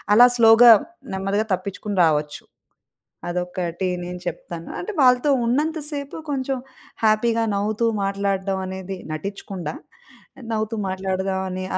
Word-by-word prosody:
అలా 245 Hz, +3 st, +9 dB
స్లోగా, 230 Hz, +1 st, +8 dB, 0.4 s
నెమ్మదిగా 195 Hz, +3 st, -1 dB
తప్పిచ్చుకుని 200 Hz, +1 st, -6 dB
రావచ్చు. 150 Hz, -2 st, -1 dB, 0.9 s
అదొక్కటి 180 Hz, 0 st, -3 dB, 0.2 s
నేను 180 Hz, 0 st, -6 dB
చెప్తాను. 170 Hz, -1 st, -7 dB
అంటే, 425 Hz, +4 st, -5 dB
వాళ్ళతో 250 Hz, +3 st, +4 dB, 0.2 s
ఉన్నంత 305 Hz, +6 st, 0 dB
సేపు, 280 Hz, -1 st, -5 dB, 0.2 s
కొంచెం 270 Hz, 0 st, -1 dB, 0.5 s
హ్యాపీ‌గా 225 Hz, +1 st, +2 dB
నవ్వుతూ 215 Hz, +3 st, 0 dB, 0.2 s
మాట్లాడడమనేది 190 Hz, -1 st, -2 dB, 0.2 s
నటిచ్చకుండా 195 Hz, 0 st, -5 dB, 0.6 s
ఆహ్, 260 Hz, -, -11 dB
నవ్వుతూ 220 Hz, 0 st, -1 dB
మాట్లాడదామని 190 Hz, 0 st, -2 dB
195 Hz, 100 wpm, -22 LUFS, 185-230 Hz, 0.9 s, అలా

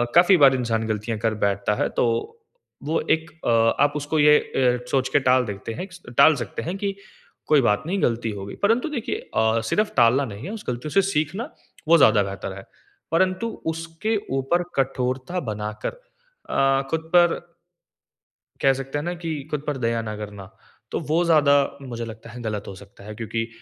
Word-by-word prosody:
काफ़ी 180 Hz, +2 st, +7 dB
बार 135 Hz, -3 st, +6 dB
इंसान 115 Hz, -3 st, -1 dB
गलतियाँ 110 Hz, +1 st, -2 dB
कर 110 Hz, -1 st, 0 dB
बैठता 100 Hz, +1 st, 0 dB
है -, -, 0 dB
तो -, -, +4 dB, 0.8 s
वो 155 Hz, +3 st, 0 dB, 0.2 s
एक 160 Hz, +1 st, -11 dB, 0.2 s
अ, -, -, +1 dB, 0.3 s
आप 145 Hz, 0 st, +2 dB
उसको 150 Hz, +2 st, -1 dB
ये 150 Hz, 0 st, +7 dB
अ, 125 Hz, -1 st, 0 dB
सोच 130 Hz, -1 st, +1 dB
के 145 Hz, -, +5 dB
टाल 130 Hz, -1 st, +4 dB
देते 105 Hz, +2 st, -6 dB
हैं 180 Hz, -, -5 dB, 0.3 s
टाल 160 Hz, -1 st, +7 dB
सकते 100 Hz, -, -6 dB
हैं 180 Hz, +3 st, -4 dB
कि 195 Hz, -1 st, -2 dB, 0.5 s
कोई 150 Hz, -3 st, +5 dB
बात 105 Hz, 0 st, +2 dB
नहीं 195 Hz, +2 st, -1 dB
गलती 115 Hz, -1 st, 0 dB
हो 95 Hz, -, -6 dB
गई। 100 Hz, -, -8 dB
परन्तु 230 Hz, +8 st, +2 dB
देखिए 265 Hz, -7 st, -3 dB, 0.2 s
अ, 110 Hz, +1 st, +3 dB
सिर्फ़ 215 Hz, 0 st, +1 dB
टालना 120 Hz, +4 st, +5 dB
नहीं 105 Hz, +6 st, -9 dB
है, 195 Hz, -, -5 dB
उस 220 Hz, -1 st, -8 dB
गलतियों 125 Hz, +5 st, -4 dB
से 195 Hz, -, +4 dB
सीखना 180 Hz, -, -2 dB, 0.4 s
वो 170 Hz, +1 st, +7 dB
ज़्यादा 115 Hz, -8 st, +5 dB
बेहतर 95 Hz, 0 st, -5 dB
है। 95 Hz, -, -9 dB, 0.5 s
परंतु 185 Hz, +6 st, +1 dB, 0.3 s
उसके 165 Hz, +7 st, -3 dB, 0.2 s
ऊपर 170 Hz, +7 st, +1 dB
कठोरता 130 Hz, +4 st, -1 dB
बनाकर 105 Hz, -, -5 dB, 0.5 s
अ, -, -, -3 dB, 0.4 s
खुद 160 Hz, 0 st, -2 dB
पर 175 Hz, -1 st, +5 dB, 1.2 s
कह 135 Hz, -1 st, +5 dB
सकते 135 Hz, +2 st, -4 dB
हैं 145 Hz, -, -3 dB
ना 175 Hz, -, -2 dB
कि 165 Hz, -1 st, -2 dB, 0.2 s
खुद 150 Hz, -1 st, -2 dB
पर 145 Hz, -2 st, -1 dB
दया 115 Hz, -2 st, 0 dB
ना 110 Hz, -1 st, -5 dB
करना। 100 Hz, -3 st, -8 dB, 0.4 s
तो -, -, -1 dB
वो 170 Hz, +3 st, +3 dB
ज़्यादा 155 Hz, -4 st, +5 dB, 0.3 s
मुझे 120 Hz, -3 st, -5 dB
लगता 115 Hz, 0 st, -10 dB
है 120 Hz, +3 st, -9 dB
गलत 105 Hz, -3 st, -4 dB
हो 100 Hz, -, -7 dB
सकता 100 Hz, +1 st, -15 dB
है। 105 Hz, +1 st, -8 dB
क्योंकि 115 Hz, +1 st, -3 dB
135 Hz, 190 wpm, -23 LUFS, 110-165 Hz, 1.2 s, काफ़ी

